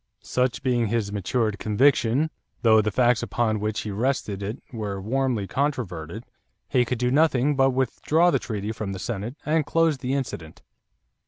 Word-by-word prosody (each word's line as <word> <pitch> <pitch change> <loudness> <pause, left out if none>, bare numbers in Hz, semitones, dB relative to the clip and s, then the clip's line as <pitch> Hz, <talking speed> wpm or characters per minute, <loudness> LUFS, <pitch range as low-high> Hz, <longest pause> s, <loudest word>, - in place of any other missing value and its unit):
Such 125 +1 -1
being 120 -3 +1
his 105 -2 -1
matured 105 +1 -1
conviction, 130 +5 +2 0.3
though 110 -2 +6
the 110 - 0
facts 120 +2 +3
upon 110 -1 0
which 105 +1 -2
he 105 - -5
rested 105 -2 -1
it 105 +5 -4 0.2
were 105 -4 -4
warmly 120 0 -1
controverted, 110 - -3 0.4
he 125 -1 +2
could 125 +1 -2
do 125 +1 0
nothing 145 -1 +3
but 135 0 +4
withdraw 150 +6 +2
the - - +2
treaty 105 -2 -4
from 110 -3 -4
the - - -5
Senate 110 +5 -4
and 155 +1 +2
close 165 -2 +1
the 130 +1 -1
incident. 85 - -5
120 Hz, 165 wpm, -25 LUFS, 105-135 Hz, 0.4 s, though